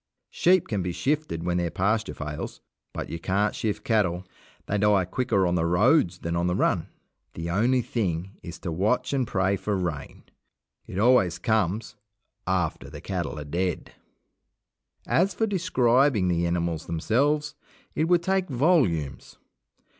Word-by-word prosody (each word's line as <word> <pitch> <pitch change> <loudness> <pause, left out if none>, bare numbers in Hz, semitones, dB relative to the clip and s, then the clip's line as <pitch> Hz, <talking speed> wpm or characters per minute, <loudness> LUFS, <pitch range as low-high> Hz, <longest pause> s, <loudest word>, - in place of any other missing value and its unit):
Sheep 180 0 +3
can 105 -3 -1
be 90 -1 -3
shifted 145 - -1
when 90 0 0
their 85 -1 0
pasture 105 +6 0
fails, 75 0 -6 0.3
but - - -5
you 85 - -5
can't 100 +5 0
shift 110 -2 -3
cattle. 95 -5 +1 0.4
They 105 - -1
die 105 -2 +3
quicker 100 0 0
on 90 - +1
the 85 -1 +1
roads 90 - +3
than 85 -1 -3
on 85 +1 0
the 90 - 0
run. 90 -4 +1 0.5
The 85 +1 -4
only 120 +6 +2
thing 95 - -2
is 85 -1 -8
to 85 - -4
watch 110 - 0
and 130 -4 0
pray 95 +1 +1
for 105 +1 -2
rain. 85 -6 -4 0.6
It - - -7
always 100 -6 +4
comes 105 +2 -1 0.5
after 70 - -1
the 75 +1 -9
cattle 85 -1 -4
are 75 - -6
dead. 90 +4 -2 1.1
As 190 +3 +2
for 225 - +1
describing 135 - +2
the 85 0 +1
animals 85 -2 -2
themselves, 140 - +1 0.4
it 155 - +1
would 175 0 +3
take 190 0 0
volumes. 120 - +1
95 Hz, 155 wpm, -26 LUFS, 85-125 Hz, 1.1 s, always